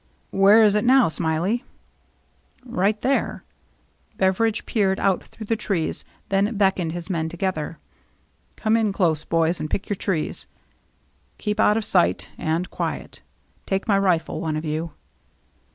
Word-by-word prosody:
"Where 200 +3 +6
is 210 -2 +5
it 210 0 +2
now, 255 -4 +5
Smiley? 165 +10 0 0.4
'* - - -40
" - - -35
Right 210 -3 0
there." 275 +1 0 0.7
Beveridge 200 +4 +1
peered 195 -4 +1
out 195 -2 +1
through 220 - -10
the 225 - 0
trees, 190 -7 -2 0.3
then 200 +3 +1
beckoned 190 -4 +2
his 170 0 -6
men 165 -4 -1
together. 170 -2 -3 0.4
" - - -41
Come 220 0 +1
in 220 -3 +1
close, 160 -5 +1
boys, 165 +1 +1
and 155 - -4
pick 195 - -3
your 205 - 0
trees. 170 - -2 0.9
Keep 210 0 -3
out 210 0 +4
of 225 - -1
sight 90 - +1
— - - -28 0.2
and 180 +2 -2
quiet. - - -4 0.5
Take 195 0 -1
my 200 -2 +3
rifle, 180 -5 0
one 155 -2 -1
of 155 - -4
you." 155 +2 -3
195 Hz, 160 wpm, -23 LUFS, 165-210 Hz, 0.9 s, Where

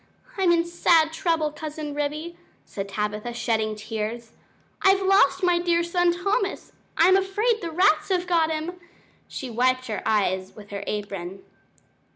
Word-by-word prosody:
I'm 380 -3 +3
in 335 0 +3
sad 335 -2 +3
trouble, 325 -3 0
Cousin 300 -1 -6
Ribby," 300 +4 -3 0.3
said 195 0 -6
Tabitha, 210 +3 -3
shedding 220 -2 -1
tears. 220 +2 -5 0.5
"I've 385 0 +4
lost 380 -3 +4
my 355 -1 +3
dear 340 -1 +1
son 350 0 +2
Thomas; 395 +3 -2 0.3
I'm 360 +3 +6
afraid 420 +4 +1
the 335 - -4
rats 325 -1 +2
have 365 -2 +1
got 335 -3 +2
him." 320 +3 -4 0.5
She 260 -3 -6
wiped 255 +2 +1
her 215 -4 -4
eyes 190 -3 0
with 205 -1 -13
her 200 0 -5
apron. 195 -3 -5
315 Hz, 150 wpm, -24 LUFS, 220-355 Hz, 0.5 s, I'm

